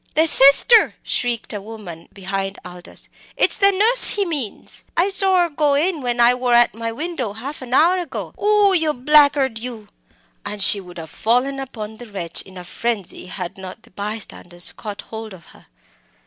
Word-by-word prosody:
"The 315 +2 +4
Sister!" 290 - +6
shrieked 240 -3 -2
a 205 - -5
woman 200 -6 -11
behind 195 0 -5
Aldous 180 -1 -11 0.3
it's - - +1
the 395 0 +5
nuss 440 +6 +4
he 405 -1 +1
means! 285 - -4
I 355 +4 +2
sor 385 -2 +3
her 345 - -2
go 290 -1 +1
in 320 +2 0
when 245 -1 -3
I 240 +1 +6
wor 250 -1 0
at 240 0 +4
my 230 +1 -5
window 280 -5 -5
half 270 +8 -8
an 255 0 -3
hour 350 +5 +4
ago. 350 - -7
Oh! 415 -1 +3
yer 320 -4 +1
blackguard, 285 -2 +3
you!" 225 -3 -9 0.5
and 210 - -6
she 200 0 +4
would 180 -1 -13
have 160 -1 -9
fallen 250 +5 0
upon 220 -5 -8
the 240 +1 -11
wretch, 175 -4 -4
in 190 -1 -14
a 180 - -8
frenzy, 205 -1 -5
had 180 0 -7
not 190 +4 -10
the - - -22
bystanders 195 -3 -2
caught 210 -2 -8
hold 220 -3 -9
of 170 - -18
her. - - -19
240 Hz, 185 wpm, -20 LUFS, 200-300 Hz, 0.5 s, Sister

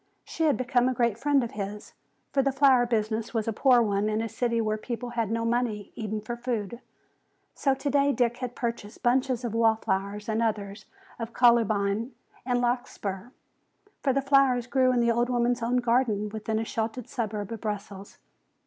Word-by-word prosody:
She 325 - -2
had 295 - +3
become 250 0 +2
a 255 - -2
great 235 -3 +1
friend 280 0 +2
of 235 - -4
his, 205 0 -6 0.4
for 275 - +3
the 275 +1 +1
flower 265 -3 +4
business 220 0 -1
was 220 -1 0
a 225 - 0
poor 245 +1 +4
one 205 0 0
in 215 0 0
a 225 - -1
city 235 +1 -1
where 215 -1 0
people 240 +2 -5
had 230 -3 -1
no 230 +1 -1
money 230 -4 -1
even 215 -1 -4
for 235 +3 -5
food. 235 -2 -3 0.7
So 275 -2 +1
today 280 +1 +2
Dick 240 -3 +1
had 250 -1 -5
purchased 230 -2 -5
bunches 255 0 +1
of 230 - -3
wall 225 -1 +4
flowers 200 -1 -3
and 220 0 0
others 210 -2 -2 0.3
of 230 0 -5
columbine 225 -1 +2 0.3
and 245 -1 +2
larkspur. 240 -4 -2 0.7
For 275 - +2
the 275 +1 0
flowers 270 -3 +3
grew 255 0 +2
in 245 -1 +2
the 235 0 +3
old 240 +1 +1
woman's 240 0 +1
own 240 +2 +1
garden 235 -4 +1
within 220 +1 -3
a 225 - -1
sheltered 225 +2 -3
suburb 215 -2 -4
of 225 - -6
Brussels. 205 -2 -6
235 Hz, 185 wpm, -27 LUFS, 215-250 Hz, 0.7 s, flower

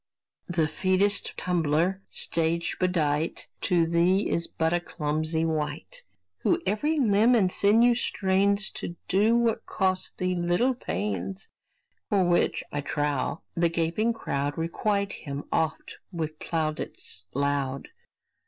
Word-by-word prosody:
The 175 -2 +1
featest 185 +6 +1
tumbler, 175 +2 +1
stage 170 +1 -1
bedight, 160 -4 0 0.2
To 175 -3 +4
thee 175 +4 +2
is 170 - 0
but 160 0 0
a 175 - +3
clumsy 155 0 -1
wight, 150 - -3 0.4
Who - - +2
every 255 +11 +1
limb 225 0 +4
and 190 -5 +3
sinew 225 +6 +4
strains 200 -2 +1
To 205 -5 -6
do 215 +5 +3
what 235 -2 0
costs 185 -2 0
thee 185 0 0
little 175 +9 +2
pains; 95 - -4 0.6
For 200 -3 +3
which, 175 0 +2
I 145 - -2
trow, 145 0 -1
the 170 0 +2
gaping 170 +7 +1
crowd 145 -10 -2
Requite 200 +5 0
him 140 0 -6
oft 160 -1 -1
with 155 -3 -4
plaudits 155 - -4
loud. 140 -1 -1
170 Hz, 125 wpm, -27 LUFS, 155-200 Hz, 0.6 s, To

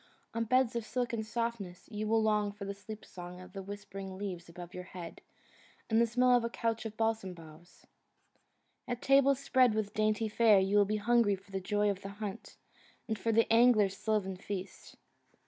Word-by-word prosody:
On 230 0 -1
beds 255 +1 +2
of 235 - -1
silken 240 -1 -2
softness 220 -5 -4
you 215 0 -3
will 220 0 +3
long 210 -1 +2
for 200 0 -8
the 200 - -3
sleep 205 +2 -10
song 180 0 -9
of 185 0 -12
whispering 195 -1 -7
leaves 180 -4 -5
above 175 +1 -10
your 180 0 -7
head, 175 -2 -9 0.7
and 225 +1 +5
the 235 - +4
smell 250 +2 +3
of 240 - +2
a 230 - -1
couch 230 -1 -2
of 215 0 -11
balsam 220 -5 -1
boughs. 165 +1 -15 1.0
At 245 -1 -4
tables 275 0 +5
spread 255 -4 +3
with 210 -1 -2
dainty 215 +1 +1
fare 215 -1 +5
you 195 +2 +1
will 205 - +5
be 210 +2 -1
hungry 225 -1 +3
for 195 +1 -18
the 190 -1 -3
joy 205 +2 +1
of 195 -1 -6
the 195 - -6
hunt, 210 0 -6 0.5
and 220 - -1
for 225 - 0
the 225 +1 +4
angler's 225 -5 +5
sylvan 210 -3 -1
feast. 195 0 -7
210 Hz, 190 wpm, -32 LUFS, 195-230 Hz, 1.0 s, and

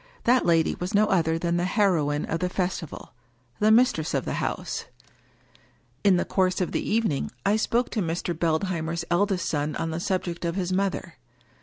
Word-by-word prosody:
That 245 -2 +3
lady 165 -2 +3
was 180 +3 -3
no 210 +1 +5
other 165 -5 +1
than 170 +1 0
the 175 - 0
heroine 170 -8 +1
of 165 - -2
the 180 - -1
festival, 180 -4 -4 0.5
the 210 - +4
mis 245 +3 +6
tress 160 0 -3
of - - -1
the - - -2
house! - - -3 1.2
In 195 -3 +5
the - - 0
course 185 -1 +1
of 180 - -1
the - - -1
evening 215 -10 0 0.2
I 205 - +4
spoke 235 +3 0
to 220 - -1
Mr. 170 0 -2
Beldheimer's 165 0 -1
eldest 185 0 +1
son 150 0 -1
on 165 - -2
the 160 - -3
subject 180 -2 -2
of 170 0 -1
his 185 -1 -1
mother. 190 -3 -2
180 Hz, 185 wpm, -26 LUFS, 165-195 Hz, 1.2 s, mis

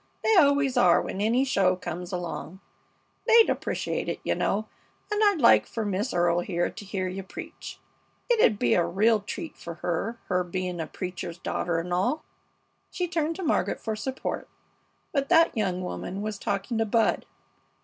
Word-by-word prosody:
They 440 - +4
always 280 -5 +4
are 180 -7 +6
when 195 - -4
any 235 +5 +2
show 195 -8 +2
comes 180 0 -6
along. 175 0 -5 0.7
They'd 460 0 +7
appreciate - - -2
it, - - -3
you - - +1
know, 215 +2 -1 0.4
and 420 0 +1
I'd 405 -5 +4
like 235 - +6
fer 225 -2 -3
Miss 205 +4 -1
Earle 175 0 +2
here 175 -1 -1
to - - -9
hear 190 -1 -2
you 185 +1 -4
preach. 190 - -9 0.5
It 480 -2 +2
'u'd 215 - +4
be 120 -9 +2
a 175 - +4
real 215 +5 +3
treat 310 - -7
to 170 -1 -7
her, 175 +7 -2
her 180 -1 +1
being 180 -1 -3
a 160 - -4
preacher's 180 -2 -6
daughter 175 -1 -2
and 175 +2 -3
all." 245 - 0 0.7
She 360 -1 -2
turned 330 -1 -1
to 380 - -6
Margaret 315 - 0
for 220 -1 -3
support, 260 +5 -4 0.6
but 275 -2 -1
that 330 -4 +5
young 185 -4 -1
woman 190 +2 -5
was 215 -2 -4
talking 200 +4 -2
to 225 - +2
Bud. 225 +1 +1
200 Hz, 180 wpm, -27 LUFS, 180-265 Hz, 0.7 s, They'd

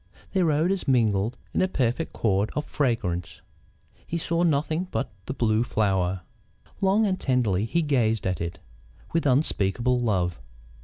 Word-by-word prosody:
Their 180 -5 +3
odours 170 +5 0
mingled 115 -3 +2 0.2
in - - +1
a 185 - +3
perfect 130 -1 -1
chord 105 -1 +1
of 150 - -1
fragrance. 90 - -1 0.7
He 170 - -2
saw 170 +1 -1
nothing 160 +2 +1
but 135 - -2 0.2
the 135 - -2
Blue 110 -3 +2
Flower. 95 -5 0 0.6
Long 200 +3 +3
and 185 -2 0
tenderly 110 -7 +1
he 170 +8 0
gazed 115 -7 +1
at 90 -3 -1
it, 85 +2 -4 0.6
with 165 -3 +1
unspeakable 125 -2 +2
love. 90 - 0
120 Hz, 145 wpm, -26 LUFS, 100-155 Hz, 0.7 s, Their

